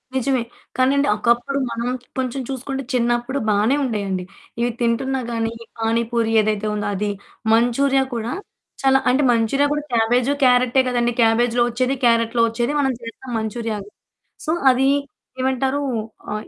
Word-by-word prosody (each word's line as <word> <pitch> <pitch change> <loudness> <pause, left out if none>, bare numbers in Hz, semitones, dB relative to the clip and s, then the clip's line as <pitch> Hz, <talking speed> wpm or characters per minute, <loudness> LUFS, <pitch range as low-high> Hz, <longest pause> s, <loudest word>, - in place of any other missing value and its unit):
నిజమే. 260 -1 +1 0.3
కానీ 255 +1 +4
అండి 280 - +2
ఒకప్పుడు 240 +5 +1
మనం 235 +1 -3 0.3
కొంచెం 260 +1 -2
చూసుకుంటే 270 +1 -4
చిన్నప్పుడు 240 +2 0
బానే 210 +6 +3
ఉండేయండి. 200 -6 -2 0.4
ఇవి 240 0 +1
తింటున్నా 265 +3 0
గాని 225 0 -1 0.3
పానిపూరి 230 0 0
ఏదైతే 215 0 -1
ఉందో 205 -1 -2
అది, 205 +1 -1 0.4
మంచూరియా 265 +4 +3
కూడా 230 +2 -3 0.5
చాలా 270 0 +4
అంటే 270 +3 +3
మంచూరియా 240 +5 +2
కూడా 295 0 -2
క్యాబేజ్ 240 +3 +2
క్యారటే 250 +1 +4
కదండీ 240 -1 +1
క్యాబేజ్‌లో 235 +1 +3
వచ్చేది 255 +3 0
క్యారట్లో 230 0 +3
వచ్చేది 240 +5 -1
మనం 265 -2 +2
చేస్తాం 235 +2 -9
మంచురియా. 220 0 -3 0.7
సో 310 - 0 0.2
అది 260 +1 +3 0.5
ఏమంటారు? 265 +2 0 0.5
ఆ! - - -1
240 Hz, 135 wpm, -21 LUFS, 230-265 Hz, 0.7 s, కానీ